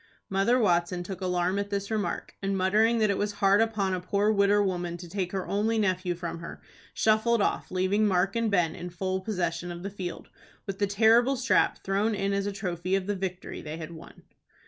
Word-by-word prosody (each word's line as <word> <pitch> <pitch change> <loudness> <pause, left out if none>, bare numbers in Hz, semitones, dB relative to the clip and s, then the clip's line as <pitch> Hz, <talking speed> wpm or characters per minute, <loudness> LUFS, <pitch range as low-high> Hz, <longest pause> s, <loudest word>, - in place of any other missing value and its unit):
Mother 195 +6 +3
Watson 175 -5 +1
took 190 +1 -7
alarm 180 +1 0
at 200 0 -3
this 200 +1 -3
remark, 215 -2 -2
and, 195 0 -1
muttering 215 +5 +3
that 215 -2 +3
it 200 - -1
was 205 0 -1
hard 200 0 +4
upon 210 -4 0
a 185 - -1
poor 200 +3 +1
widder 205 0 +3
woman 175 -3 -2
to 175 0 -9
take 185 0 -3
her 190 -2 -3
only 220 +3 0
nephew 185 -4 0
from 170 -1 -5
her, 165 - -8 0.3
shuffled 220 +2 +2
off, 205 - 0
leaving 190 +3 +1
Mark 195 +1 +1
and 230 -1 +1
Ben 175 -5 +2
in 175 +1 -7
full 185 +2 -2
possession 175 -4 -2
of 175 0 -8
the 200 - -4
field, 185 -3 -6 0.4
with 195 0 -5
the 205 - +2
terrible 225 +6 +4
strap 255 0 +1
thrown 205 +3 +1
in 200 0 -1
as 200 0 0
a - - -1
trophy 185 -2 -2
of 195 -1 -1
the 205 +1 -1
victory 185 -1 -5
they 155 +1 -6
had 165 0 -7
won. 160 - -13
195 Hz, 215 wpm, -28 LUFS, 180-205 Hz, 0.4 s, hard